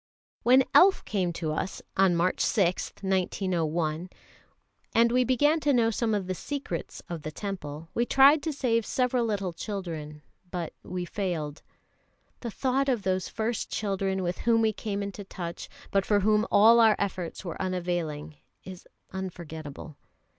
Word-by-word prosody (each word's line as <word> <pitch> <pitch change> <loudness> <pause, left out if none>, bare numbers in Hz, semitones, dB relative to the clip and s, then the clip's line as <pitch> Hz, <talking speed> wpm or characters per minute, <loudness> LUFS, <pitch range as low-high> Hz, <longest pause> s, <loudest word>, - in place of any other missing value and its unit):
When 250 +2 +6
the - - -3
Elf 380 +1 +6
came 185 -5 0
to 160 -2 -3
us 185 +4 -3 0.2
on 190 -2 +4
March 175 +2 +1
6, 185 -4 +1
1901, 175 -3 -1 0.9
and 230 0 +5
we 250 +1 +4
began 290 +6 +3
to 295 -2 +2
know 230 -2 +3
some 220 0 0
of 200 -2 -2
the 185 - -2
secrets 225 - -5
of 170 -2 -5
the 155 - -5
Temple, 160 -5 -6
we 240 +1 0
tried 280 +3 +6
to 320 - -2
save 240 -5 +1
several 250 +1 +1
little 200 -5 -2
children, 165 -6 -6 0.3
but 175 -3 -4
we 180 -1 -4
failed. 170 -6 -3 0.8
The 235 - -5
thought 265 +4 0
of 240 -6 0
those 185 -1 0
first 225 0 -2
children 195 -2 -1
with 175 0 -2
whom 230 -1 +3
we 220 -1 +2
came 205 -1 -3
into 200 0 -6
touch, 175 -3 -7 0.2
but 195 -1 +2
for 205 0 +2
whom 215 +2 +3
all 225 +3 +7
our 220 -2 +6
efforts 185 -2 -3
were 170 - -5
unavailing, 170 -5 -3 0.3
is 185 -1 -10 0.2
unforgettable. 160 -5 -7
190 Hz, 160 wpm, -28 LUFS, 175-230 Hz, 0.9 s, all